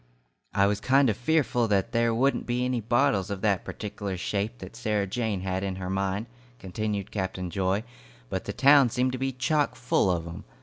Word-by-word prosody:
"I 100 - +5
was 100 0 +1
kind 135 +2 +4
of - - -4
fearful 125 -2 +1
that 100 -3 +1
there 115 0 +2
wouldn't 130 +5 +1
be 125 +1 0
any 125 -2 -1
bottles 120 -3 +2
of 100 -2 -4
that 100 -4 +1
pertikeler 100 -2 -5
shape 105 +5 -2
that 95 -4 -10
Sarah 105 -2 0
Jane 105 -1 -2
had 95 0 -2
in 95 -1 -2
her 95 0 -4
mind," 95 +2 -1 0.3
continued 100 +1 -4
Captain 95 -3 -3
Joy, 95 +2 0 0.4
"but - - -4
the - - -3
town 140 -2 +6
seemed 125 +2 0
to 130 - -4
be 135 0 0
chock 145 +3 0
full 125 -5 +1
of 85 -2 0
'em. 85 0 -8
105 Hz, 200 wpm, -27 LUFS, 95-125 Hz, 0.4 s, town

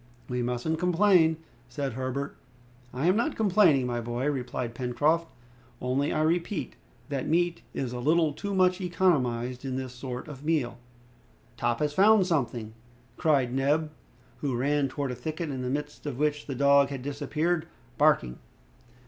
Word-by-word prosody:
"We 125 0 -2
mustn't 125 +6 -1
complain," 180 -2 +4 0.3
said 135 0 -3
Herbert. 130 +3 -3 0.6
"I 130 +5 -2
am 180 +2 +4
not 235 +8 0
complaining, 185 - +4
my 120 -1 -2
boy," 120 +5 -1
replied 125 -3 -4
Pencroft, 145 +7 +1 0.5
"only 130 +3 0
I 155 - +1
repeat, 170 +3 -1 0.3
that 140 -2 -2
meat 175 +1 +1
is 125 -2 -2
a 125 - -4
little 155 +3 +2
too 200 +5 -4
much 185 0 +3
economized 130 -9 +1
in 130 -2 -3
this 130 -1 -4
sort 125 +1 -6
of 145 -2 -9
meal." 150 -7 0 0.8
"Top 120 +1 -1
has 150 -1 0
found 200 +2 +5
something!" 120 - -1 0.4
cried 135 -6 +2
Neb, 145 +4 +1 0.5
who 140 -4 -2
ran 140 +2 +1
towards 135 0 -3
a - - -6
thicket, 155 +5 -4
in 130 -2 -4
the 125 - -2
midst 145 +2 -4
of 135 -4 -4
which 150 0 0
the 135 - -4
dog 140 +1 +5
had 135 -3 -5
disappeared, 155 +4 -1 0.3
barking. 145 - +3
145 Hz, 155 wpm, -28 LUFS, 125-160 Hz, 0.8 s, found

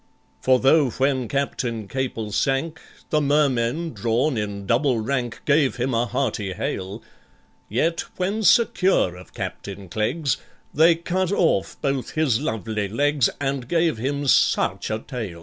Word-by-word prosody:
For 130 0 +4
though, 140 +1 +4
when 130 0 0
CAPTAIN 120 -5 -2
CAPEL 120 -4 -3
sank, 140 +8 -1 0.3
The 155 - +3
Mermen 145 +1 +1
drawn 120 +6 0
in 100 -2 -4
double 125 +4 +2
rank 120 +1 -2
Gave 140 -2 +3
him 125 +1 -1
a 115 +1 +1
hearty 110 -7 -2
hail, 95 +4 -4 0.7
Yet 165 +10 0 0.2
when 195 +4 -1
secure 190 - +3
of 90 0 -14
CAPTAIN 100 -2 -6
CLEGGS, 125 - 0 0.4
They 165 +3 +5
cut 180 +2 -1
off 165 - +1
both 135 -2 -1
his 140 -6 +2
lovely 110 -6 -2
legs, 140 +4 +2
And 135 -3 -2
gave 165 -7 +1
him 140 +4 -2
such 135 - +2
a 110 - -1
tail! 110 - -6
130 Hz, 140 wpm, -23 LUFS, 110-150 Hz, 0.7 s, They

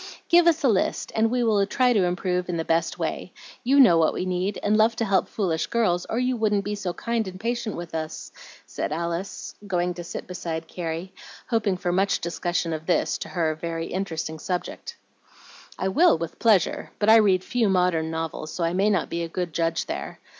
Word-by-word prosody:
"Give 345 0 +6
us 325 -2 +3
a - - +5
list, 210 -6 0
and 225 +1 +2
we 245 +1 +1
will 215 -3 +3
try 250 +2 +3
to 200 -5 +3
improve 180 0 -1
in 175 - -1
the 160 - -2
best 165 +1 0
way. - - -3 0.3
You 270 +3 +4
know 200 -11 +7
what 160 - +2
we - - -2
need, 185 +2 -1
and 210 +1 +3
love 220 +1 +4
to 225 - -1
help 195 -3 +2
foolish 175 -7 -1
girls, 185 -7 +1
or 225 - -1
you 250 +1 +1
wouldn't 210 -3 +1
be 205 - -2
so 200 -3 -3
kind 230 +2 -2
and 185 0 -8
patient 235 -1 -2
with 170 -1 -7
us," 160 0 -5 0.3
said - - -4
Alice, 170 +4 -4
going 180 -1 0
to 175 0 -7
sit 170 - -6
beside 165 -3 -5
Carrie, 170 +1 -5 0.4
hoping 215 -5 +1
for 175 0 -1
much 195 +2 +2
discussion 170 0 -2
of 155 0 -6
this, 180 - +1
to - - -6
her, 165 -3 0
very 165 +1 -4
interesting 165 -4 -3
subject. 180 +2 -4 0.8
"I 190 - -1
will, 295 - +4
with 165 0 -6
pleasure; 210 -7 +2
but 205 - 0
I 220 +1 +8
read 190 -4 +4
few 235 -2 +1
modern 180 -4 +2
novels, 160 -1 -4
so 175 - -3
I 165 +1 +1
may 195 +3 +2
not 200 - +1
be 170 - -3
a 170 - -2
good 175 -1 -3
judge 165 0 0
there. - - -5
185 Hz, 210 wpm, -25 LUFS, 170-215 Hz, 0.8 s, I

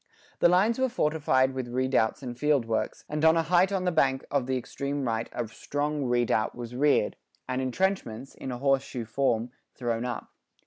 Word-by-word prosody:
The 175 - +6
lines 205 +7 +3
were 260 0 +2
fortified 150 - +2
with 130 -2 -4
redoubts 130 0 +1
and 120 -2 -5
field 145 -1 +2
works, 115 -1 -2
and 150 +1 -3
on 160 +1 +6
a 165 - +3
height 180 +4 +3
on 190 -2 0
the 180 - +2
bank 135 -5 +2
of 140 -3 0
the 130 0 0
extreme 140 +3 -3
right 115 0 -1
a 120 - -3
strong 145 +5 -2
redoubt 120 -3 +1
was 120 -1 -7
reared, 145 +3 +2 0.3
and 130 0 -1
entrenchments, 130 - -1
in 130 - -6
a 125 - -4
horse 135 +1 +2
shoe 125 -3 -6
form, 120 0 0 0.2
thrown 120 -2 -2
up. 125 -2 -5
130 Hz, 190 wpm, -28 LUFS, 120-150 Hz, 0.3 s, The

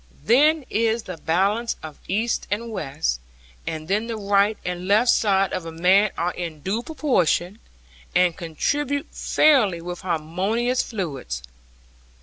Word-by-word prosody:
Then 290 - +4
is 225 0 0
the 185 -2 -7
balance 200 +9 0
of 155 -2 -9
east 220 +5 -1
and 230 +3 -3
west, 140 - -2 0.5
and 155 -1 -4
then 210 +5 0
the 230 -1 -3
right 200 +1 +2
and 180 0 -4
left 220 +5 +5
side 195 -3 +2
of 180 - -2
a 165 - -7
man 185 +6 +4
are 175 +2 -1
in 165 -4 -6
due 200 +8 -1
proportion, 225 - 0 0.6
and 180 -1 +4
contribute 285 - -1
fairly 235 - +3
with 175 +1 -6
harmonious 190 +9 0
fluids. 140 - -5
195 Hz, 135 wpm, -23 LUFS, 170-230 Hz, 0.6 s, left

